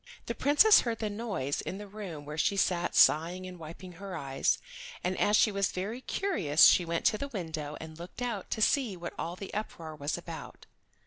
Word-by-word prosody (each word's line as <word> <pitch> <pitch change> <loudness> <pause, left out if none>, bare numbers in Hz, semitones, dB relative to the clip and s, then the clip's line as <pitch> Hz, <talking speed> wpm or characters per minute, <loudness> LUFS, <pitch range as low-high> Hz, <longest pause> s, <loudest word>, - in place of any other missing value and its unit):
The - - -2
Princess 300 +10 +6
heard 230 -2 -2
the 215 -2 -3
noise 200 - -2
in 190 - -5
the 205 0 -8
room 190 -8 -8
where 150 +1 -6
she 195 +5 +1
sat 180 -2 +1
sighing 175 +4 +4
and 180 -1 -9
wiping 170 +3 -9
her 190 +1 -7
eyes, 135 -3 0 0.5
and 180 +1 0
as 210 0 +4
she 215 - +4
was 200 -1 0
very 210 +7 -4
curious 190 - +1
she 180 - +6
went 170 0 -2
to 215 - +3
the 280 - -3
window 160 - -5
and 160 0 -10
looked 180 +8 -7
out 225 -6 -3
to 220 - 0
see 245 -9 +2
what 175 0 -6
all 170 +2 -3
the 195 +1 -8
uproar 165 -7 -5
was 145 0 -2
about. - - -9
185 Hz, 205 wpm, -30 LUFS, 160-215 Hz, 0.5 s, Princess